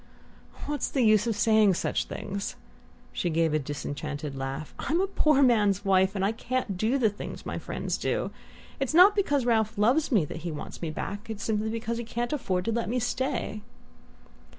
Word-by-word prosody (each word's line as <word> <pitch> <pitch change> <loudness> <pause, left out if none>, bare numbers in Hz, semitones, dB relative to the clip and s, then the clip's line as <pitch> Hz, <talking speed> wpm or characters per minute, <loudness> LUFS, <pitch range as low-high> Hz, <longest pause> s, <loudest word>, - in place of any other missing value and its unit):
"What's 295 0 -2
the 265 - +1
use 215 -1 +4
of 225 - 0
saying 215 -2 +4
such - - -1
things?" 200 +1 -5 0.6
She 175 - -1
gave 165 -1 +1
a 155 - +2
disenchanted 145 0 -5
laugh. 135 +3 -5
"I'm 325 +5 0
a 385 - +3
poor 305 -7 +3
man's 205 -5 +3
wife, 190 0 +3
and 195 -1 +1
can't 255 -5 -2
do 220 +8 +1
the 245 -5 +3
things 205 0 -6
my - - -3
friends - - -3
do. - - -1 0.5
It's 270 +3 -1
not 380 +4 +8
because 290 - +1
Ralph 225 -2 +1
loves 255 +10 +3
me 200 -10 +4
that 150 - -7
he 165 +1 -5
wants 150 - -7
me 165 - -2
back 205 +8 -5
it's 215 -1 -5
simply 220 0 0
because 230 +1 -3
he - - -3
can't 240 +3 -3
afford 185 -10 -1
to 230 - 0
let 230 -1 -1
me 245 - 0
stay!" 245 -3 -2
220 Hz, 190 wpm, -27 LUFS, 185-245 Hz, 0.6 s, not